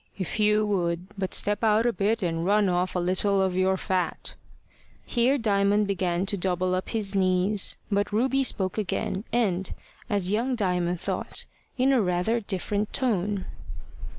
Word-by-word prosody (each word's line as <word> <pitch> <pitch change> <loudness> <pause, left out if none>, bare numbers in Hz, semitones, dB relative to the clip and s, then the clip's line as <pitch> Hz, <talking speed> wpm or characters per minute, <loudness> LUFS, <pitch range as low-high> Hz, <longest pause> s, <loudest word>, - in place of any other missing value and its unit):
If 190 +3 -4
you 210 0 +3
would 180 -3 -1
but 190 -2 -3
step 205 +2 0
out 220 +1 +3
a 240 - +2
bit 210 +3 0
and 165 -1 -1
run 205 +2 +3
off 180 +1 0
a - - +1
little 190 +3 +2
of 190 -1 +1
your 190 +1 +2
fat!" 185 -3 -2 0.7
Here 250 +3 +2
Diamond 205 -2 +2
began 185 -2 -1
to 200 +1 0
double 185 0 0
up 185 0 -2
his 210 -3 -2
knees; 185 +1 +2 0.2
but 205 +1 0
Ruby 260 +5 +1
spoke 190 -5 0
again, 200 +1 -2
and, 195 -6 0 0.4
as 200 -3 +1
young 240 +5 0
Diamond 180 -5 -1
thought, - - -3 0.3
in 265 +2 +3
a 255 - +3
rather 180 +5 0
different 205 0 -2
tone. 205 -6 0
200 Hz, 160 wpm, -26 LUFS, 185-215 Hz, 0.7 s, you